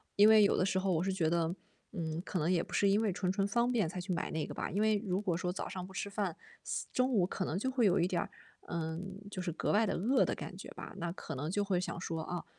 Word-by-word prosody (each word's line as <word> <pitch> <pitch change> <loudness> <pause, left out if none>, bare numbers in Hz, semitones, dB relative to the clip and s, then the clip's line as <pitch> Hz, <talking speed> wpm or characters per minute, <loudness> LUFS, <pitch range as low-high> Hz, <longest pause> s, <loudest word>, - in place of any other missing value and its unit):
因 210 +2 +8
为 215 -1 +8
有 200 - +4
的 - - +2
时 190 - +1
候 190 0 +1
我 165 +2 +1
是 190 - 0
觉 175 -4 +1
得， 170 +1 +1 0.4
嗯， 165 -3 -3
可 185 - -3
能 165 +3 +1
也 170 -2 +3
不 - - -9
是 200 - +4
因 200 +3 +4
为 210 -3 +2
纯 185 0 0
纯 195 0 +1
方 235 +4 +2
便 210 -9 +2
才 180 - -5
去 180 +1 -2
买 170 - -2
那 160 -1 -1
个 - - -7
吧。 - - -3
因 195 - -1
为 215 -1 +3
如 190 -1 0
果 185 -5 0
说 180 +1 -1
早 185 - -4
上 185 -1 -5
不 - - -13
吃 190 - -3
饭， 200 -4 -2 0.6
中 255 +1 +2
午 195 -7 +4
可 190 0 -3
能 165 - -2
就 260 +6 -1
会 250 -3 +2
有 185 -1 +4
一 175 - +3
点 175 -2 0
儿， - - -5 0.4
嗯， 170 +4 -4
就 185 -2 -4
是 175 -2 -2
格 - - -1
外 220 +2 +4
地 - - 0
饿 245 +9 +3
的 - - -1
感 - - -7
觉 - - -8
吧。 - - -8
那 170 0 -2
可 175 - -6
能 150 +5 -3
就 205 +1 +1
会 185 -3 +1
想 170 - -4
说， 165 -3 -3
啊 175 +1 -4
185 Hz, 320 characters per minute, -33 LUFS, 170-205 Hz, 0.6 s, 因